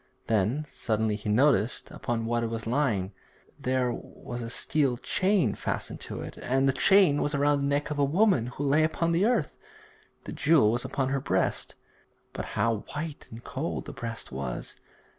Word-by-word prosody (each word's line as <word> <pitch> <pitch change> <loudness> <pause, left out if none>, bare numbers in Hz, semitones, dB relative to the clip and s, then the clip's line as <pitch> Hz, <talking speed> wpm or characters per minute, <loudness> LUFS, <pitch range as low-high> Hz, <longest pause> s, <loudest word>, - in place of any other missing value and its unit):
Then 115 +8 +1
suddenly 110 -4 -1
he 105 0 -5
noticed 120 -1 +2
upon 115 -1 -3
what 120 +1 0
it 115 - -1
was 115 0 -4
lying. 110 -7 0 0.5
There 130 -1 +1
was 120 +1 -8
a 115 - -5
steel 135 0 +1
chain 185 - +1
fastened - - -3
to - - -5
it, - - -8
and 135 +2 +1
the 135 - +3
chain 180 0 +5
was 145 0 0
around 145 0 +3
the 140 - 0
neck 145 +1 0
of 145 - -2
a - - +4
woman 160 - +3
who 125 +3 -5
lay 145 +3 +3
upon 165 +2 +1
the 170 +4 +3
earth; 230 - 0 0.6
the - - -7
jewel 145 -9 +4
was 120 +1 0
upon 135 0 -1
her 135 0 0
breast. - - 0 0.6
But - - -4
how 115 -1 +2 0.2
white 150 0 -5
and 115 +1 -10
cold - - -4
the - - -7
breast 115 -1 -6
was! 65 -2 -4
130 Hz, 180 wpm, -28 LUFS, 115-150 Hz, 0.6 s, chain